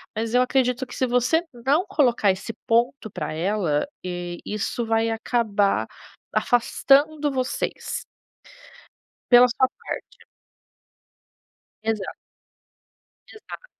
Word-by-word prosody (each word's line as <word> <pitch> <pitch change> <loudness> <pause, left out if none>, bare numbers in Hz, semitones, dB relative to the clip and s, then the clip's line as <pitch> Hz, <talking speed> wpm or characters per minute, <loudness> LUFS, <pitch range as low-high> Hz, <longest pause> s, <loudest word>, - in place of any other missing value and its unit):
mas 225 +1 -2
eu 250 - +5
acredito 255 0 +1
que - - -9
se 260 - +1
você 250 +7 +2 0.2
não 300 +7 +3
colocar 250 - +3
esse 195 +4 -5
ponto 235 -1 +1
pra 155 -4 -4
ela, 170 -2 0 0.2
e 175 -1 -5
isso 215 +3 -2
vai 225 0 +1
acabar 220 -3 +1 0.5
afastando 285 +5 +2
vocês. 255 -1 -3 1.3
Pela 245 +1 +9
sua 260 +2 +2
parte. - - -9 1.6
Exato. 220 -3 -2 1.1
Exato. 435 +3 -11
240 Hz, 100 wpm, -24 LUFS, 210-260 Hz, 1.6 s, Pela